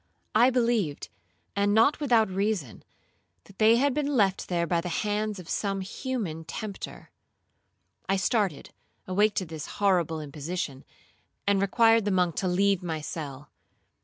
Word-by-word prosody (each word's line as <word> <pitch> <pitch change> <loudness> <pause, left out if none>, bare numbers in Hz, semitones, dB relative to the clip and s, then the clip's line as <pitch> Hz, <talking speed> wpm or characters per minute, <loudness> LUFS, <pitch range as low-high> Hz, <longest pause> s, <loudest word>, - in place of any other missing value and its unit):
I 235 +4 +6
believed, 230 - 0 0.5
and 205 +1 +2
not 225 +7 +4
without 240 -7 +3
reason, 190 - -2 0.8
they 220 +1 +6
had 275 +3 +2
been 290 -1 0
left 195 -3 +2
there 170 -2 +1
by 170 0 0
the 180 - -5
hands 210 +3 -1
of 180 -3 -10
some 195 +1 -1
human 190 - -4
tempter. 200 +4 -7 1.0
I 195 - +3
started, 190 - 0 0.4
awake 205 +3 +2
to 185 - -1
this 155 -3 -7
horrible 175 -6 +2
imposition, 150 -1 -5 0.6
and 200 -1 +2
required 225 +2 +4
the - - +1
monk 180 -3 +1
to 190 - 0
leave 195 +1 +2
my 165 -3 -3
cell. 150 -2 -7
195 Hz, 140 wpm, -27 LUFS, 170-220 Hz, 1.0 s, I